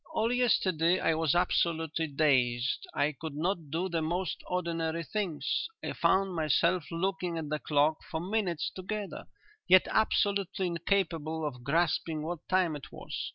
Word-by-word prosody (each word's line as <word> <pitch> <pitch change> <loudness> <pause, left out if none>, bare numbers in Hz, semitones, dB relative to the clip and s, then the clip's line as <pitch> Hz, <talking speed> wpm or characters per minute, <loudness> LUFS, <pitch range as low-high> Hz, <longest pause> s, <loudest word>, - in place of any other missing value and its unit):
All 225 +2 +2
yesterday 185 -8 +2
I 165 - +2
was 160 -1 +1
absolutely 165 -2 +1
dazed; 135 - +1
I 150 - +1
could 155 +1 -7
not 165 0 -2
do 165 +5 -1
the 170 -3 -1
most 175 +4 -2
ordinary 170 -2 -1
things. 170 -5 -2 0.2
I - - -3
found 190 0 +2
myself 165 +2 +1
looking 180 0 -2
at 155 -2 -4
the 150 0 -1
clock 150 +1 +2
for 160 - -2
minutes 180 -3 -1
together, 200 +2 -5 0.4
yet 185 0 +6
absolutely 200 -3 +1
incapable 165 -3 -1
of 125 -4 -5
grasping 155 +1 0
what 170 +1 -3
time 185 -4 +2
it 145 - -9
was. - - -5
165 Hz, 150 wpm, -30 LUFS, 155-185 Hz, 0.4 s, yet